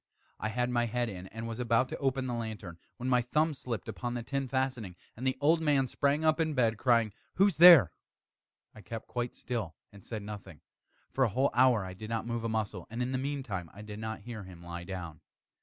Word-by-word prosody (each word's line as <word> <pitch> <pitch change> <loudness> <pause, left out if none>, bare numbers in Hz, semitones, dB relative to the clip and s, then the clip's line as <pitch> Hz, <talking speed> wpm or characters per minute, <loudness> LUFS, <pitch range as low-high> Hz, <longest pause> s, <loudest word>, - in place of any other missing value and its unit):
I 110 - -2
had 125 +2 -1
my 120 -1 +1
head 120 +1 -1
in, 95 -2 -7
and 115 +3 -6
was 115 +1 -5
about 120 +1 +2
to - - -4
open 135 -1 0
the 125 - -2
lantern, 110 -7 -5 0.2
when 125 - -4
my 125 -1 +4
thumb 150 +6 +1
slipped 125 -5 -5
upon 120 -1 -4
the 120 - -3
tin 135 +2 -2
fastening, 130 -7 -2 0.2
and 125 +4 -3
the 130 - 0
old 160 +3 +4
man 145 -4 +3
sprang 140 +4 +1
up 155 +1 +3
in 160 -2 0
bed, 115 -4 +2
crying 115 -3 +3
out - - -21 0.2
"Who's 195 -3 +3
there?" 165 - +10 0.8
I 110 - -12
kept 110 +4 -7
quite 120 +1 -3
still 110 -9 -4 0.2
and 100 -2 -15
said 110 -3 -5
nothing. 100 -5 -9 0.5
For 130 - +2
a 120 - +3
whole 130 +7 +1
hour 120 -5 +4
I 95 - -6
did 110 +4 -8
not 115 -1 -2
move 115 -1 -3
a 115 - -1
muscle, 105 -5 -2
and 115 +3 -2
in 125 - -2
the 130 - -1
meantime 130 - -3
I 105 - -9
did 105 0 -8
not 110 -1 -5
hear 115 0 -7
him 90 -2 -12
lie 85 0 -7
down. 90 -5 -7
115 Hz, 230 wpm, -31 LUFS, 105-130 Hz, 0.8 s, there